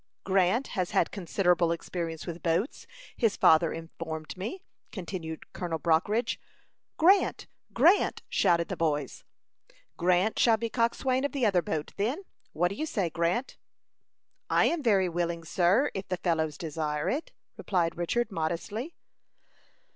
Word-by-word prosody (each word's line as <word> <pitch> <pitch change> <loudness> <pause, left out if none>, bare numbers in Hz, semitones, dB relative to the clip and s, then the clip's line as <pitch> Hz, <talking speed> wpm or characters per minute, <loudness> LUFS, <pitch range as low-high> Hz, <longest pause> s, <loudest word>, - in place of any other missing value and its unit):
"Grant 195 +6 +2
has 180 -2 -2
had - - +1
considerable 180 -2 +1
experience 165 -1 -4
with 170 -1 -6
boats, 175 - -1 0.3
his 225 -5 +1
father 160 +1 +5
informed 165 -1 -6
me," 225 - -6 0.3
continued 170 -4 -6
Colonel 170 -3 -3
Brockridge. 180 - +1 0.6
"Grant! 375 +5 +4 0.3
Grant!" 410 - +3
shouted 170 -1 +2
the - - -2
boys. 150 -4 -2 0.7
"Grant 180 +4 +2
shall 230 -2 +5
be 230 0 -3
coxswain 255 +2 +1
of 285 - -1
the 270 -4 +1
other 190 -4 +3
boat, 155 -2 -4
then. 245 - -1 0.3
What 175 +3 +1
do - - -5
you 310 - -2
say, 190 - -1
Grant?" 170 +10 -1 0.9
"I - - +4
am 340 -2 +1
very 200 -7 +3
willing, 170 -1 -2
sir, 190 - +2
if 195 0 -5
the 185 - -2
fellows 160 -4 0
desire 150 -2 -3
it," 295 +5 -2 0.2
replied 170 -4 0
Richard, 215 +7 -1
modestly. 195 - -3
180 Hz, 140 wpm, -28 LUFS, 165-225 Hz, 0.9 s, father